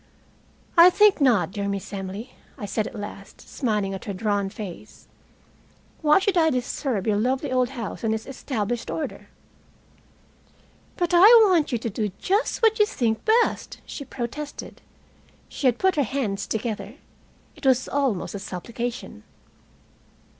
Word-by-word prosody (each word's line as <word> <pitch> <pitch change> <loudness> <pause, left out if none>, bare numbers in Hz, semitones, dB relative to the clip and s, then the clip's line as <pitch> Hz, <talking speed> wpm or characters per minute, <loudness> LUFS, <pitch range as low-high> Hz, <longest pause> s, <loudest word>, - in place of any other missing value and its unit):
"I 340 +2 +10
think 415 -2 +4
not, 210 - +3
dear 200 0 -3
Miss 200 0 -4
Emily," 200 +5 -6 0.2
I 205 - -5
said 215 +2 -2
at 215 - -8
last, 200 -1 -9
smiling 210 -6 -1
at 190 - -7
her 200 - -4
drawn 205 0 -1
face. 200 -3 -10 0.9
"Why 300 -1 +5
should 390 0 +1
I 320 -1 +5
disturb 250 -4 -2
your 210 -2 +1
lovely 255 +5 0
old 255 -1 +2
house 240 -6 -6
and 225 - +1
its 220 0 -2
established 240 -4 -4
order?" 315 - -5 1.7
"But 350 0 -1
I 350 +4 +8 0.2
want 350 -8 +2
you 240 - +1
to 230 +1 -4
do 210 +1 -2
just 415 +4 0
what 445 0 +4
you 420 - +6
think 225 - -1 0.2
best," - - -5
she 280 - -7
protested. 275 +3 -7 0.7
She 275 - -1
had 245 -2 +2
put 380 +1 +1
her - - +4
hands 215 -6 -2
together. 215 -1 -4 0.6
It - - -18
was 260 -1 +3
almost 270 -9 -1
a 200 - -5
supplication. 235 - -6
235 Hz, 150 wpm, -24 LUFS, 205-285 Hz, 1.7 s, I